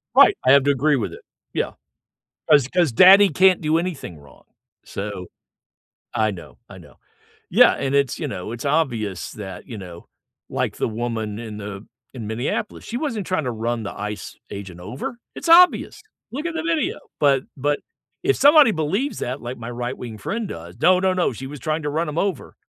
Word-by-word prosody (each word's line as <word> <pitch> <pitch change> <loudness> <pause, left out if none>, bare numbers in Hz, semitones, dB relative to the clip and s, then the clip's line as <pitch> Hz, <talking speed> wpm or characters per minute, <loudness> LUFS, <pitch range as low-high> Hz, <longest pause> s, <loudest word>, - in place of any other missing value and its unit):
Right, - - +7
I 130 - +6
have 140 0 +6
to 145 - +3
agree 145 +2 +2
with 120 - -2
it. - - -11 0.3
Yeah, - - -1 0.8
'cause 140 -3 +6
'cause 170 -2 +1
daddy 195 - +8
can't 185 +3 +4
do 155 +1 +2
anything 165 - -4
wrong. 70 -3 -18 0.4
So, 100 -2 -6 0.9
I 110 -1 +2
know, 90 -4 -11
I - - -11
know. - - -16 0.5
Yeah, - - +6
and 135 0 -2
it's 140 -3 +1
you - - -2
know, 95 +2 -6
it's 120 +3 -6
obvious 120 - -1
that 95 -4 -8
you 115 -4 -7
know, 90 -3 -10 0.4
like - - -2
the - - 0
woman 110 -2 -3
in 110 -3 -7
the 100 -1 -7 0.3
in 120 -5 -7
Minneapolis, 120 - -3
she 235 - -4
wasn't 230 - -3
trying 185 -5 0
to 125 - -1
run 115 0 -2
the 100 - -5
ICE 105 0 -6
agent 95 -3 -8
over, 120 - -6 0.2
it's 335 - -5
obvious! 360 +2 +5 0.3
Look 290 +6 -5
at 340 - -2
the 320 - -2
video, 330 -5 0 0.2
but 135 -2 +3
but 145 +2 0 0.4
if 405 +2 +3
somebody 290 -3 +7
believes 195 - -1
that 130 +3 -4
like 120 +2 -6
my 115 0 -7
right 120 +1 -4
wing 115 -3 -7
friend 220 - -3
does 85 - -9
"No, 180 +2 +5
no, 190 0 +2
no, 180 -5 +1
she 130 +4 -7
was 145 0 -9
trying 155 -1 -2
to 145 - -1
run 160 +3 -1
'em 150 - -6
over." 190 -8 -2
135 Hz, 195 wpm, -22 LUFS, 110-180 Hz, 0.9 s, daddy